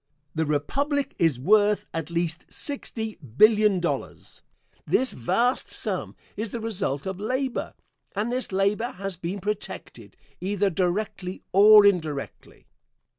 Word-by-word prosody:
The 160 Hz, -1 st, -1 dB
Republic 280 Hz, -, -1 dB
is 160 Hz, -7 st, +2 dB
worth 210 Hz, +7 st, +3 dB
at 165 Hz, -1 st, -3 dB
least 170 Hz, 0 st, -2 dB
sixty 225 Hz, -6 st, -3 dB
billion 205 Hz, -, +4 dB
dollars. 175 Hz, -, -4 dB, 0.5 s
This 260 Hz, -, +2 dB
vast 235 Hz, -, 0 dB
sum -, -, -2 dB, 0.2 s
is 220 Hz, +1 st, -3 dB
the 235 Hz, -, -5 dB
result 195 Hz, -11 st, -2 dB
of 190 Hz, -1 st, -4 dB
labor, 255 Hz, +4 st, -2 dB, 0.4 s
and 215 Hz, +4 st, -1 dB
this 255 Hz, -2 st, -2 dB
labor 200 Hz, +5 st, 0 dB
has 195 Hz, 0 st, -4 dB
been 175 Hz, +3 st, -4 dB
protected 210 Hz, +2 st, -6 dB, 0.2 s
either 200 Hz, +1 st, 0 dB
directly 185 Hz, +1 st, -2 dB
or 210 Hz, +2 st, +8 dB
indirectly. 160 Hz, -8 st, -1 dB
200 Hz, 125 wpm, -25 LUFS, 175-220 Hz, 0.5 s, or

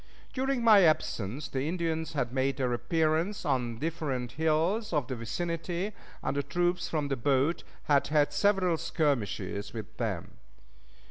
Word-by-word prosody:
During 265 Hz, -2 st, 0 dB
my 215 Hz, -3 st, +8 dB
absence 145 Hz, -, +1 dB
the 135 Hz, +2 st, -2 dB
Indians 160 Hz, -2 st, -2 dB
had 125 Hz, -5 st, -1 dB
made 135 Hz, +1 st, +1 dB
their 125 Hz, -3 st, 0 dB
appearance 165 Hz, -, 0 dB
on 125 Hz, -5 st, 0 dB
the -, -, -12 dB
different 145 Hz, -6 st, -2 dB
hills 160 Hz, -, +1 dB
of 150 Hz, -4 st, +1 dB
the 130 Hz, -, -4 dB
vicinity, 170 Hz, -, -3 dB, 0.3 s
and -, -, -1 dB
the 140 Hz, -, +1 dB
troops 175 Hz, +5 st, 0 dB
from 150 Hz, -3 st, -1 dB
the 135 Hz, -, +1 dB
boat 140 Hz, +6 st, +1 dB, 0.2 s
had 145 Hz, -2 st, +3 dB
had 145 Hz, -1 st, +2 dB
several 185 Hz, +1 st, +3 dB
skirmishes 105 Hz, -, -1 dB
with 110 Hz, -3 st, -8 dB
them. 105 Hz, -8 st, -3 dB
150 Hz, 150 wpm, -30 LUFS, 130-170 Hz, 0.3 s, my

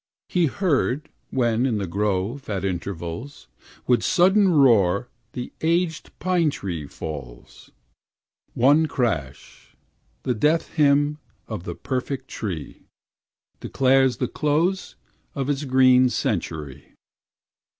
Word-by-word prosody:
He 175 Hz, -3 st, +2 dB
heard, 150 Hz, -4 st, 0 dB, 0.2 s
when 120 Hz, -1 st, +1 dB
in 115 Hz, -5 st, 0 dB
the 100 Hz, -, -2 dB
grove, 105 Hz, +7 st, -2 dB
at 100 Hz, -2 st, -2 dB
intervals, 90 Hz, -, -5 dB, 0.4 s
With 125 Hz, -1 st, +3 dB
sudden 190 Hz, +2 st, +4 dB
roar 115 Hz, -, +4 dB, 0.2 s
the 125 Hz, -, -6 dB
aged 165 Hz, 0 st, 0 dB
pine 180 Hz, -3 st, +1 dB
tree 85 Hz, -, -5 dB
falls, 70 Hz, -7 st, -9 dB, 0.9 s
One 145 Hz, +6 st, +4 dB
crash, 85 Hz, -, -4 dB, 0.5 s
the 125 Hz, -, 0 dB
death 150 Hz, +8 st, +1 dB
hymn 145 Hz, 0 st, +2 dB, 0.3 s
of 105 Hz, -6 st, -6 dB
the 85 Hz, -, -5 dB
perfect 130 Hz, +1 st, -4 dB
tree, 90 Hz, -8 st, -6 dB, 0.7 s
Declares 130 Hz, -1 st, +2 dB
the -, -, -1 dB
close 165 Hz, +6 st, 0 dB, 0.4 s
of 140 Hz, 0 st, -1 dB
its 145 Hz, +1 st, -2 dB
green 130 Hz, -1 st, +5 dB
century. 75 Hz, -, -4 dB
130 Hz, 110 wpm, -23 LUFS, 95-150 Hz, 0.9 s, green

